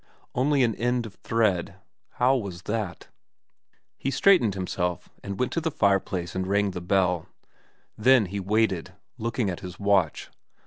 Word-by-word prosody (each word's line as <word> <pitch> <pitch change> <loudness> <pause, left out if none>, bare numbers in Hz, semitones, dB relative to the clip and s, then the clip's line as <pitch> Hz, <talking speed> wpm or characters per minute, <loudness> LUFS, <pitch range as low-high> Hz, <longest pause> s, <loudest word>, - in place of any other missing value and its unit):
Only 135 +2 +2
an 115 -2 +2
end 120 +1 0
of 105 - -9
thread. 105 -7 0 0.4
How 130 +2 +3
was 95 -7 -4
that? 105 -5 -4 0.9
He 135 - -1
straightened 135 - +4
himself, 90 -2 -3
and 100 -1 -5
went 125 - 0
to 165 - -1
the 160 - 0
fireplace 95 - 0
and 95 0 -2
rang 100 0 +1
the 90 - -6
bell. 90 -2 +1 0.7
Then 125 0 +5
he 100 +2 -4
waited, 100 -2 0 0.3
looking 115 0 -1
at 90 -2 -3
his 90 -2 -9
watch. 100 -6 +1
100 Hz, 150 wpm, -26 LUFS, 90-120 Hz, 0.9 s, Then